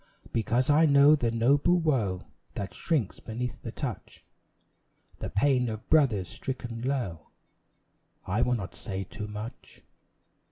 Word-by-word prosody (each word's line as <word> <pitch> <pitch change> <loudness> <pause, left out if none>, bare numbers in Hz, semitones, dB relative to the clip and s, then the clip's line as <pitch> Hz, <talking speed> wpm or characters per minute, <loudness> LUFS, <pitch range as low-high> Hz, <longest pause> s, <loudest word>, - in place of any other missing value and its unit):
Because 120 +5 +2
I 155 +2 +5
know 140 +1 +7
the 120 -6 0
noble 140 +9 +3
woe 125 - 0 0.3
That 100 -1 -4
shrinks 140 - -1
beneath 115 0 -5
the - - -6
touch - - -6 0.9
The - - -4
pain 125 +2 +2
of 110 -1 -6
brothers 125 - +4
stricken 120 +3 -5
low 120 - -3 1.0
I 100 +6 0
will 125 0 +2
not 100 -6 -5
say 95 -4 -5
too 105 +3 -7
much. 105 +3 -9
120 Hz, 130 wpm, -28 LUFS, 105-140 Hz, 1.0 s, know